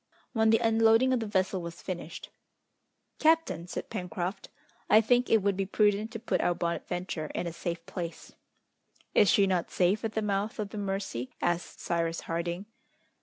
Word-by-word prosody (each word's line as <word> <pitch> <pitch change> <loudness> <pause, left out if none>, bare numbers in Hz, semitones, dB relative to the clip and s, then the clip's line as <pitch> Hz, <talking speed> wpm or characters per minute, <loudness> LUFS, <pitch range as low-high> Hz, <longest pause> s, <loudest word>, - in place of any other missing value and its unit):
When 220 -2 +3
the 225 - +6
unloading 225 +2 +4
of 255 - +2
the 225 - -3
vessel 190 -2 0
was 170 0 -8
finished, 175 -3 -6 0.9
"Captain," 310 - +2
said - - -6
Pencroft, 185 -1 -4 0.4
"I 215 - +8
think 245 +3 +3
it 220 -3 +4
would 200 -1 +2
be 195 0 -1
prudent 210 +1 +2
to 225 - -4
put 230 - 0
our 175 - +2
Bonadventure 170 -1 -3
in - - -1
a 170 - -4
safe 170 0 -4
place." 170 -2 -6 0.8
"Is 205 - +5
she 200 - +5
not 185 -3 0
safe 185 +4 +2
at 220 -1 -2
the 220 - -1
mouth 205 +1 -1
of 210 -2 -3
the 210 - -6
Mercy?" 195 -11 -3
asked 175 0 -1
Cyrus 170 -1 -1
Harding. 170 +3 -3
195 Hz, 170 wpm, -29 LUFS, 175-220 Hz, 0.9 s, I